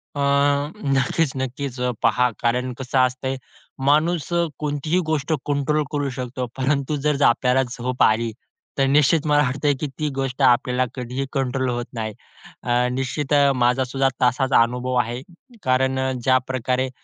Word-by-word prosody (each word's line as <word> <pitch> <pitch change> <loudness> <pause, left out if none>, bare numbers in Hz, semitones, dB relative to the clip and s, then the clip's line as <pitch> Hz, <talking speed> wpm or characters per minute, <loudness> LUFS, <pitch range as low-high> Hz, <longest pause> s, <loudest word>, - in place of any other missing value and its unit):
अ, - - -4 0.7
नक्कीच 135 +3 +1
नक्कीच, 130 0 -4 0.3
पहा, 125 +2 +3
कारण 125 +2 0
कसं 130 0 -2
असतंय, 130 +1 0 0.5
माणूस 155 +2 +2
अ, 170 0 +2
कोणतीही 150 +3 -1
गोष्ट 155 0 0
कंट्रोल 145 +1 0
करू 145 -2 -1
शकतो, 125 0 -3
परंतु 140 +2 0
जर 145 -1 +1
आपल्याला 125 +2 +3
झोप 125 +1 0
आली, 115 +1 +2 0.5
तर 135 - +3
निश्चित 145 +2 +3
मला 145 0 +4
वाटत 135 +3 -3
आहे 145 - +4
की 150 - -2
ती 150 -1 0
गोष्ट 135 0 -3
आपल्याला 125 0 +3
कधीही 125 +1 -4
कंट्रोल 130 -1 -1
होत 120 0 -2
नाही. 110 -2 -4 0.5
अ, 125 +1 +2
निश्चित 135 +3 -2
अ, 140 -1 +5
माझा 125 +1 +2
सुद्धा 135 +1 0
तसाच 125 +2 +2
अनुभव 125 +2 -1
आहे, 120 +3 -5 0.4
कारण 130 +1 +1
अ, 130 0 0
ज्याप्रकारे 130 0 +1
130 Hz, 150 wpm, -22 LUFS, 125-145 Hz, 0.7 s, अ